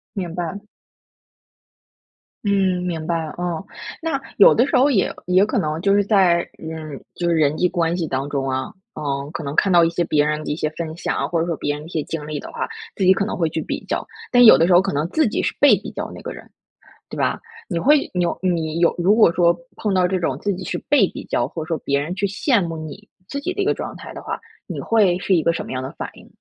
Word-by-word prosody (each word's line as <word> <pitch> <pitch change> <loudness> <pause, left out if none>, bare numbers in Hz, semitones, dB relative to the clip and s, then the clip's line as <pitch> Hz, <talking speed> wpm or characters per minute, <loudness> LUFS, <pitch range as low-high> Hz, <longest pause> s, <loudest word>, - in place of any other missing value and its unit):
明 180 -4 -4
白。 175 +1 -3 1.9
嗯， 190 -3 +1
明 165 -3 -3
白， 165 -2 -1
哦。 175 +1 -3 0.4
那 315 -4 -1 0.2
有 200 - +8
的 240 - +3
时 - - +2
候 270 +3 +5
也 195 -6 +1
也 185 +2 +4
可 215 - -2
能 155 +2 -2
就 200 0 +3
是 205 - +4
在 185 -5 +3
嗯， 160 -3 -7 0.2
就 175 - -2
是 170 - +2
人 150 -1 +2
际 180 - +3
关 170 0 0
系 165 - -2
当 135 +1 -2
中 135 -2 -2
啊， 130 0 -2 0.2
呃， 140 -2 -3
可 155 - -5
能 140 +1 -4
看 195 - +3
到 170 - +7
一 165 - +3
些 170 +1 -1
别 150 -2 +2
人 150 0 -1
的 - - -3
一 150 - -1
些 155 - -1
分 160 -2 -4
享， 175 - -2
或 165 -2 0
者 170 - -1
说 165 - -2
别 145 - -1
人 150 - -6
的 155 - -10
一 - - -12
些 160 -4 -2
经 160 -2 -5
历 150 -1 -4
的 - - -9
话， - - -3 0.3
自 195 - -2
己 185 - +6
可 200 - -1
能 - - -3
会 165 -2 0
去 160 - -3
比 - - -4
较。 - - -2 0.3
但 245 -1 +7
有 220 - +10
的 165 - +3
时 180 - +4
候 175 - +7
可 195 -5 -2
能 150 +3 0
自 310 - +2
己 215 - -1
是 - - -1
被 - - +7
比 - - -8
较 - - -5
那 - - -10
个 - - -6
人， - - -11 0.6
对 - - -7
吧？ - - 0 0.3
你 175 - -1
会 290 - +3
你 180 -1 +1
有 170 - -1
你 165 -3 -1
有 170 - +4
如 185 +5 +3
果 215 -7 +6
说 170 0 +3 0.2
碰 210 -3 -1
到 185 -1 +3
这 185 0 -1
种 135 -6 -1
自 200 -1 0
己 185 - -6
是 - - -2
被 290 - +5
比 - - -8
较， - - 0
或 160 - -6
者 155 - -11
说 165 - -1
别 140 0 +1
人 165 +5 -4
去 200 - -1
羡 205 +3 +1
慕 165 - -5
你 155 +7 -9 0.2
自 280 - -4
己 365 +6 -3
的 405 - -2
一 - - 0
个 435 - +3
状 - - -6
态 - - -10
的 - - -8
话， - - -4 0.3
你 - - -6
会 200 -6 +3
是 190 0 +2
一 160 - +2
个 170 - +2
什 - - -4
么 - - -9
样 130 0 -3
的 130 - -5
反 - - -6
应？ - - -15
170 Hz, 290 characters per minute, -21 LUFS, 155-195 Hz, 1.9 s, 有